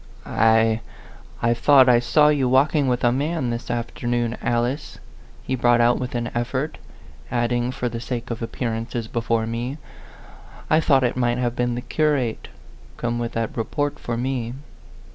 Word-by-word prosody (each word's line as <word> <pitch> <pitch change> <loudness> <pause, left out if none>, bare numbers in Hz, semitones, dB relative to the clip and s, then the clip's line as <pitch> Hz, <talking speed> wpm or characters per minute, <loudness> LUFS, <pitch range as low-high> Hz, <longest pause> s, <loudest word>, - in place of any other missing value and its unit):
"I 110 0 +3 0.6
I 115 0 +4
thought 130 +2 +5
I 120 -1 +6
saw 125 +5 +4
you 140 -4 +2
walking 140 +2 +3
with 125 -1 0
a 120 - +4
man 145 0 -1
this 120 +1 -5
afternoon, 120 0 -2
Alice," 120 +5 -1 0.5
he - - -3
brought 120 -1 +3
out 120 +1 +3
with 125 -1 -4
an 120 0 -2
effort; 130 +5 -2 0.5
adding, 120 +1 0
for 125 - -3
the 115 -1 -4
sake 120 0 -5
of 115 - -4
ap 115 - -4
pearances 115 -1 -3
before 115 -1 -1
me, 120 +5 -4 0.9
"I 155 - +6
thought 140 -4 +3
it 125 - +1
might 120 -1 +1
have 120 -1 -1
been 120 -1 0
the 120 - -3
curate, 140 -5 0 0.5
come 120 0 -2
with 120 -1 -3
that 115 -1 -2
report 145 +5 -2
for 120 -1 -3
me." 125 -1 -2
120 Hz, 165 wpm, -23 LUFS, 115-130 Hz, 0.9 s, I